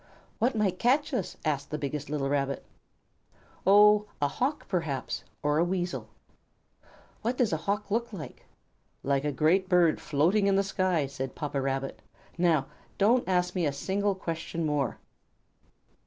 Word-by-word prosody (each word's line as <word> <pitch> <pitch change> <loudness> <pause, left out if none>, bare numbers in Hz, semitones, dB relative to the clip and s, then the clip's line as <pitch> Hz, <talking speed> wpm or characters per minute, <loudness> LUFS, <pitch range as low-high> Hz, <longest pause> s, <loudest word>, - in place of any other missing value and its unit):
"What 235 +2 +2
might 195 -4 0
catch 275 +5 +2
us?" 215 -8 -2
asked 145 -2 -1
the 150 - -2
biggest 145 0 -4
little 145 -2 -1
Rabbit. 140 -1 -1 1.0
"Oh, 210 +1 +6
a 145 - +2
Hawk, 265 - -2
perhaps, 160 -8 -2 0.2
or 150 +1 +2
a - - +4
Weasel." 180 0 -2 1.1
"What 245 +3 -1
does 235 -8 +2
a - - +2
Hawk 205 0 -1
look 235 +2 0
like?" 180 -8 -8 0.6
"Like 140 +1 +1
a 150 - +1
great 170 +7 +2
bird 175 -4 +4
floating 175 +8 +2
in 195 - +3
the 195 - +3
sky," 185 -5 +1
said 135 -1 -5
Papa 145 -2 -2
Rabbit. 135 0 -2 0.3
"Now, 165 -5 +2 0.3
don't 235 +5 +3
ask 180 -1 +1
me 175 -4 +1
a - - 0
single 195 +8 -1
question 165 -2 -4
more." 145 -5 0
175 Hz, 155 wpm, -28 LUFS, 145-200 Hz, 1.1 s, Oh